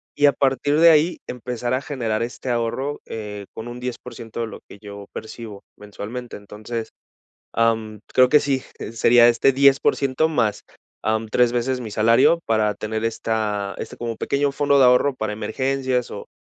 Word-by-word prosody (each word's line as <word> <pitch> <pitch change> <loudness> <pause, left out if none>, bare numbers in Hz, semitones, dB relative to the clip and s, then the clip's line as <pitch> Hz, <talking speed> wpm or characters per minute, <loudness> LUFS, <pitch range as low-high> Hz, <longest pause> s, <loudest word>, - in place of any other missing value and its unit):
y 145 - +3
a 140 - +5
partir 140 +3 +1
de 170 - +8
ahí 160 +2 +4
empezar 125 0 -3
a 130 - -2
generar 115 -7 -2
este 125 +2 -6
ahorro, 120 +5 -2
eh, 105 -2 -7
con 110 +2 -7
un 120 +1 -7
10% 120 -2 -7
de 115 - -1
lo 110 - -10
que 100 - -13
yo 100 -1 -9
percibo 110 -2 -8 0.2
mensualmente. 105 +4 -8
Entonces, 110 +3 -7 0.6
am, 110 -2 0
creo 130 0 +5
que 150 - +6
sí, 135 -2 0 0.3
sería 120 +1 +5
este 120 +3 +3
10% 140 +2 +3
más, 115 -8 0 0.4
am, 110 0 0
3 120 +1 +2
veces 125 +1 -1
mi 115 - -6
salario 115 +9 +4
para 110 -2 +1
tener 110 +2 -4
esta, 105 -3 -2
este - - -7
como 115 -2 -4
pequeño 140 0 0
fondo 140 0 +2
de - - +7
ahorro 125 +2 +4
para 110 -4 -3
emergencias 130 +3 -1
o 100 - -8
120 Hz, 170 wpm, -22 LUFS, 110-130 Hz, 0.6 s, de